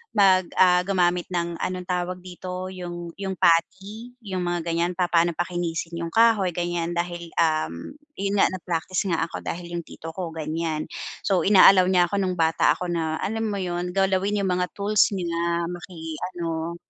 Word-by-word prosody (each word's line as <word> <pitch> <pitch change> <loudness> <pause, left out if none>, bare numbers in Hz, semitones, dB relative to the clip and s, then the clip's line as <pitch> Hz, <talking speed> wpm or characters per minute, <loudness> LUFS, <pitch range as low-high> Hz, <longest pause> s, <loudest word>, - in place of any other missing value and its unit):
mag 190 -3 +5
ah, 180 -1 +6
gumamit 180 -2 +1
ng 170 -1 -1
anong 180 -1 -3
tawag 180 0 -2
dito? 185 0 -6
Yung 175 -2 -6
yung 190 -1 -3
putty 195 +8 +1
yung 190 -2 -3
mga 175 -1 -1
ganyan 170 +1 +1
papaano 175 -1 +3
pakinisin 170 -1 -3
yung 165 0 -4
kahoy 225 -5 +4
ganyan 175 -1 -2
dahil, 175 -1 -3
um, 155 - 0 0.2
yun 200 +1 -1
nga - - +6
na-practice 180 0 -2
nga 165 -1 0
ako - - -7
dahil 175 0 -5
yung 170 - -3
tito 165 0 -9
ko 180 -3 -4
ganyan. 155 0 -3 0.4
So, 190 -2 +2
ina-allow 190 -2 +7
niya 180 -2 +4
ako 200 - -1
nung 185 -1 -1
bata 160 0 +3
ako 180 - -5
na 160 -2 -1
alam 225 +2 -2
mo 200 - -2
yun? 180 -1 -3
Galawin 195 +1 +1
yung 190 - 0
mga 180 0 0
tools 205 0 +3
niya 170 -2 -1
maki-ano. 170 -1 -5
175 Hz, 165 wpm, -24 LUFS, 170-185 Hz, 0.4 s, ina-allow